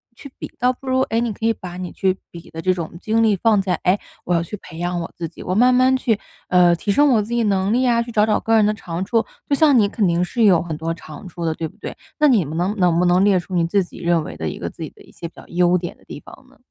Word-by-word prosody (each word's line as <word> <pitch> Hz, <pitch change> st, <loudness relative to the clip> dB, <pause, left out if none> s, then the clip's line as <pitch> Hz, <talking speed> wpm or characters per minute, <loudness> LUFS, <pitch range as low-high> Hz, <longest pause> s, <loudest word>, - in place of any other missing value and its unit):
去 280 Hz, -, -12 dB
比， -, -, -6 dB
倒 250 Hz, +1 st, +3 dB
不 260 Hz, +1 st, -13 dB
如， 260 Hz, 0 st, +2 dB
哎， 230 Hz, -3 st, 0 dB
你 235 Hz, -2 st, -1 dB
可 220 Hz, -, -5 dB
以 230 Hz, -, +4 dB
把 180 Hz, -4 st, -9 dB
你 180 Hz, -1 st, -6 dB
去 190 Hz, -1 st, 0 dB
比 170 Hz, -1 st, -12 dB
的 165 Hz, 0 st, -7 dB
这 185 Hz, +1 st, +2 dB
种 170 Hz, -1 st, -6 dB
精 220 Hz, +1 st, +1 dB
力 220 Hz, -2 st, +3 dB
放 210 Hz, +1 st, +2 dB
在， 185 Hz, -2 st, -1 dB
哎， 185 Hz, +3 st, +2 dB, 0.2 s
我 180 Hz, -, -1 dB
要 170 Hz, -, +2 dB
去 170 Hz, +5 st, -6 dB
培 160 Hz, -, -12 dB
养 175 Hz, 0 st, -2 dB
我 165 Hz, -, -7 dB
自 170 Hz, -, -4 dB
己， 160 Hz, -, -12 dB
我 185 Hz, -, -2 dB
慢 250 Hz, +5 st, +4 dB
慢 255 Hz, +1 st, +4 dB
去， 235 Hz, -5 st, 0 dB, 0.3 s
呃， 180 Hz, -1 st, +5 dB
提 185 Hz, -, -7 dB
升 290 Hz, +7 st, +4 dB
我 235 Hz, -5 st, +3 dB
自 215 Hz, +3 st, -5 dB
己 235 Hz, -1 st, +1 dB
能 195 Hz, 0 st, +1 dB
力 250 Hz, -, +2 dB
呀， 235 Hz, -2 st, +2 dB
去 235 Hz, 0 st, -6 dB
找 210 Hz, -1 st, +4 dB
找 215 Hz, -, +1 dB
个 225 Hz, -, +1 dB
人 215 Hz, -2 st, +4 dB
的 210 Hz, -, +2 dB
长 175 Hz, -4 st, -5 dB
处， 225 Hz, +3 st, 0 dB, 0.2 s
就 -, -, +1 dB
像 290 Hz, -2 st, +4 dB
你 205 Hz, -3 st, +3 dB
肯 205 Hz, -2 st, 0 dB
定 170 Hz, +1 st, +1 dB
是 230 Hz, +6 st, -1 dB
有 180 Hz, -5 st, +5 dB
很 165 Hz, -3 st, -5 dB
多 165 Hz, +1 st, -3 dB
长 160 Hz, +2 st, -11 dB
处 175 Hz, -1 st, -8 dB
的， 160 Hz, -, 0 dB
对 160 Hz, 0 st, -4 dB
不 -, -, -18 dB
对？ -, -, -8 dB, 0.2 s
那 300 Hz, -, +5 dB
你 220 Hz, -, +3 dB
能 175 Hz, +7 st, -2 dB
能 175 Hz, -3 st, +3 dB
不 175 Hz, -, +2 dB
能 180 Hz, +2 st, +3 dB
列 200 Hz, -2 st, +4 dB
出 180 Hz, +2 st, -10 dB
你 170 Hz, -1 st, +2 dB
自 195 Hz, +3 st, +1 dB
己 175 Hz, -, -13 dB
认 170 Hz, -2 st, +1 dB
为 80 Hz, -, -8 dB
的 80 Hz, -, -4 dB
一 -, -, -7 dB
个 -, -, -5 dB
自 -, -, -15 dB
己 -, -, -5 dB
的 -, -, -21 dB
一 -, -, -19 dB
些 170 Hz, -, -7 dB
比 165 Hz, -, -17 dB
较 -, -, -13 dB
优 180 Hz, +1 st, +2 dB
点 175 Hz, -1 st, -6 dB
的 -, -, -25 dB
地 -, -, -9 dB
方 -, -, -15 dB
呢？ -, -, -23 dB
190 Hz, 340 characters per minute, -20 LUFS, 175-225 Hz, 0.3 s, 呃